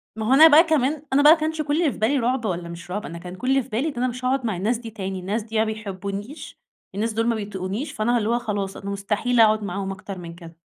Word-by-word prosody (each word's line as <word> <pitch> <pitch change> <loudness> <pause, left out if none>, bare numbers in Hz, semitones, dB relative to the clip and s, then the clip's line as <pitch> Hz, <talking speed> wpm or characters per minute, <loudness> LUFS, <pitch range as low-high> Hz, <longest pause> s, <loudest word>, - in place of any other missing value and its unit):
ما 220 0 -4
هو - - +5
أنا 310 +4 +9
بقى 315 +1 +7
كمان 300 -2 0
أنا 285 - +5
بقى 300 - +9
ما 330 - -1
كانش 315 0 -2
كُلّ 295 0 -1
اللي 315 -5 +2
في - - -9
بالي 230 +7 +1
رعُب 245 0 0
والّا 175 -4 -3
مش 170 +1 -9
رعُب، 205 +4 -3
أنا 170 - -7
كان 180 +1 -9
كُلّ 255 +7 -4
اللي 270 0 +3
في 250 - -16
بالي 250 +8 -1
إن 305 - -3
أنا 250 +1 +1
مش 250 +1 -5
هاقعد 260 0 0
مع 215 -5 -1
الناس 220 +6 0
دي 230 -1 -8
تاني، 195 -3 -5
الناس 205 +5 -2
دي 225 +1 -10
يا - - +3
ما 220 - +3
بيحبونيش، 200 +5 -7 0.4
الناس 220 +2 -1
دول 225 +1 0
ما 235 - +2
بيطيقونيش، 205 +5 -4
فأنا 240 -1 0
اللي 220 -1 -1
هو 240 +1 +2
خلاص 205 -4 -3
أنا 200 - -7
مستحيل 210 +5 -1
أقعد 215 -1 +5
معاهم 195 0 -3
أكتر 195 0 -7
من 170 -1 -9
كده. 170 -1 -13
220 Hz, 285 wpm, -23 LUFS, 195-255 Hz, 0.4 s, أنا